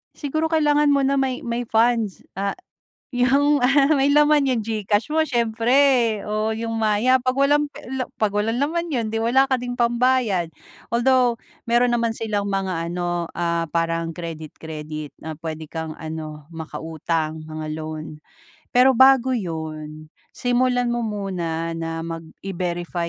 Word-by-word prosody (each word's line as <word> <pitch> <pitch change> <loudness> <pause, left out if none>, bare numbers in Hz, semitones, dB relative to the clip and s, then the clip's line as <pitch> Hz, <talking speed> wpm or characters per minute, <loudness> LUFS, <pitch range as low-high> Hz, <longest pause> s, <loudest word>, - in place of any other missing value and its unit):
Siguro, 310 +2 -1
kailangan 300 -2 +3
mo 280 - +3
na 275 +1 +2
may 260 -1 -1
may 235 0 -3
funds, 225 -3 +1
ah, 200 +1 -1 0.6
yung, 275 +3 +3
ah, 275 +3 +4
may 275 0 +3
laman 295 -1 +4
yung 240 -3 0
Gcash 210 -1 0
mo 320 - +4
siyempre 235 -5 0 0.6
o 215 +1 -1
yung 225 +1 -3
Maya. 225 +4 +2
'Pag 255 +1 0
walang 295 +1 +2
pe - - -12
la 260 0 -3
'pag 215 -2 +1
walang 220 +3 0
naman 335 +5 -1
yun 240 -6 -1
di 225 0 -1
wala 260 +4 +4
ka 265 - +1
ding 245 -1 -3
pambayad. 235 -7 +2 0.4
Although, 245 0 +3 0.3
meron 240 +1 +3
naman 235 -1 +1
silang 210 -3 -2
mga 185 -4 -2
ano, 175 -1 -2
ah, 170 -1 -1
parang 165 0 -1
credi, 165 -2 -6
credit 155 -1 -7
na 160 -1 -6
pwede 160 -1 -6
kang 160 -1 -5
ano, 155 -2 -7
maka-utang 160 -1 -4
mga 155 0 -6
loan. 155 -1 -6 0.5
Pero 255 +2 +5
bago 260 0 +6
yun, 155 -6 -5 0.2
simulan 245 0 +1
mo 240 - -1
muna 180 -6 -3
na 165 0 -4
mag 165 0 -5 0.2
i-verify 175 -2 -3
220 Hz, 150 wpm, -22 LUFS, 165-255 Hz, 0.6 s, bago